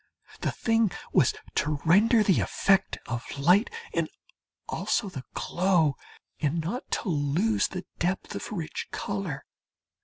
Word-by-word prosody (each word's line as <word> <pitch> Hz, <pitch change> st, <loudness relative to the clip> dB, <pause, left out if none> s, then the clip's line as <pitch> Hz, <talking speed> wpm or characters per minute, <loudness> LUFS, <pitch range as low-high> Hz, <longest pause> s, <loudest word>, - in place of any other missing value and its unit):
The -, -, 0 dB
thing 225 Hz, -2 st, +2 dB, 0.2 s
was -, -, +5 dB, 0.2 s
to 150 Hz, 0 st, +1 dB
render 215 Hz, +7 st, +5 dB
the 195 Hz, -4 st, +4 dB
effect 195 Hz, 0 st, +2 dB
of 120 Hz, 0 st, -3 dB
light 180 Hz, -, +4 dB, 0.2 s
and -, -, 0 dB, 0.6 s
also 205 Hz, -, 0 dB
the 135 Hz, -8 st, -7 dB
glow, 175 Hz, -6 st, +2 dB, 0.4 s
and 155 Hz, +2 st, 0 dB
not 185 Hz, -, -4 dB
to 205 Hz, -, -3 dB
lose 160 Hz, +8 st, +2 dB
the 185 Hz, -1 st, -6 dB
depth 180 Hz, +2 st, -1 dB
of -, -, -5 dB
rich 170 Hz, -7 st, -4 dB
colour. 195 Hz, -9 st, -4 dB
180 Hz, 130 wpm, -28 LUFS, 155-205 Hz, 0.6 s, was